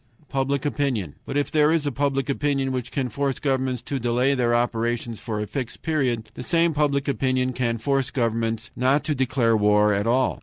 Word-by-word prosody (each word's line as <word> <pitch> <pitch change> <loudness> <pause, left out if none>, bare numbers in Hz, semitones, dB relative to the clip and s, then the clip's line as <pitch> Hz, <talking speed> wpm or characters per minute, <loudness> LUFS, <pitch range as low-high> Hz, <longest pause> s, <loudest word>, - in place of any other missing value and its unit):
Public 135 +1 -1
opinion. 130 - -1
But 140 - -2
if 145 -1 0
there 150 0 +4
is 160 -2 +1
a 145 - 0
public 135 0 0
opinion 140 -1 0
which 125 -2 -3
can 135 -2 -1
force 140 +3 -1
governments 130 -3 -1
to 135 +1 -3
delay 125 +3 +2
their 120 -3 +2
operations 120 -1 -1
for 110 -3 -4
a 105 - -2
fixed 125 +2 -5
period, 125 -9 -1
the - - -8
same 165 +4 +2
public 145 -2 +1
opinion 130 -1 0
can 120 -2 -1
force 135 +3 0
governments 115 -1 -1
not 130 +4 +2
to 155 - 0
declare 125 -4 +2
war 105 0 +4
at 100 +2 0
all. 130 +2 +1
130 Hz, 195 wpm, -24 LUFS, 115-140 Hz, -, there